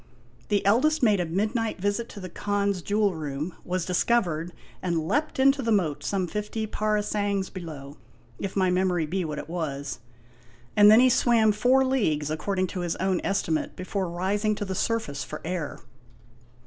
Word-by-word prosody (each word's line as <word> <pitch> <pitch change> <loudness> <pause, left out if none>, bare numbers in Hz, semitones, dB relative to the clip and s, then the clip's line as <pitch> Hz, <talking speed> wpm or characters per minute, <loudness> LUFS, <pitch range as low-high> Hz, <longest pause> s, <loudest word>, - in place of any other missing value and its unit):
"The 205 -1 +1
eldest 260 +9 +3
made 210 -4 +4
a 175 - -1
midnight 215 +5 -1
visit 205 +5 -1
to 205 - -9
the 185 - -6
Khan's 200 +1 -1
jewel 205 +1 +1
room, 155 +1 -4
was 180 -1 -2
discovered 180 -4 +1 0.3
and 170 -3 -1
leaped 295 - 0
into 275 +1 +4
the 230 -2 0
moat, 175 -9 +1
some 195 -2 0
fifty 210 +4 -3
parasangs 210 -2 -1
below, 150 -6 -8 0.4
if 195 - -4
my 185 -2 +2
memory 180 -2 +1
be 185 +4 -2
what 155 -3 -4
it - - -6
was; 145 -5 -4 0.8
and 205 0 +8
then 220 +3 +8
he 255 - +6
swam 230 -3 +4
four 250 +5 +3
leagues, 155 - 0
according 185 +4 -1
to 185 - -3
his 175 -2 -2
own 185 0 0
estimate, 165 -5 -1
before 185 0 -3
rising 200 +5 0
to 205 - -4
the 190 - -3
surface 185 -9 -1
for 155 - -7
air." 170 -3 -3
195 Hz, 170 wpm, -26 LUFS, 170-215 Hz, 0.8 s, and